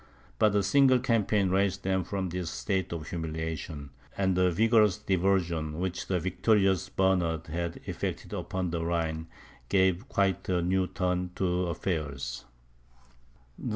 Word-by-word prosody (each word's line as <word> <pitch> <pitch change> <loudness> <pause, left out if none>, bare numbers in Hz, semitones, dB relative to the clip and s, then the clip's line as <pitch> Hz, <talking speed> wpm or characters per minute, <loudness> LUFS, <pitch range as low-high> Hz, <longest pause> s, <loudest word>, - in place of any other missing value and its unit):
But 105 -2 +4
a 100 - +3
single 130 +5 +5
campaign 105 -5 +1
raised 95 0 +1
them 95 -1 +1
from 95 +1 -3
this 90 -1 -3
state 90 +10 -2
of 80 -2 -5
humiliation; 80 -3 -4 0.3
and 95 -2 +2
the 90 0 +4
vigorous 105 +1 +4
diversion, 90 -6 0
which 90 0 -3
the 90 -2 +1
victorious 95 +1 +2
Bernard 90 -5 +1
had 85 +1 -4
effected - - -4
upon 90 -2 -3
the 85 -1 -2
Rhine, 80 -1 -1 0.4
gave 95 +4 +2
quite 95 -1 0
a 90 -2 +1
new 95 +1 +1
turn 90 0 -1
to 90 -1 0
affairs. 70 -7 -3
90 Hz, 135 wpm, -29 LUFS, 85-95 Hz, 0.4 s, single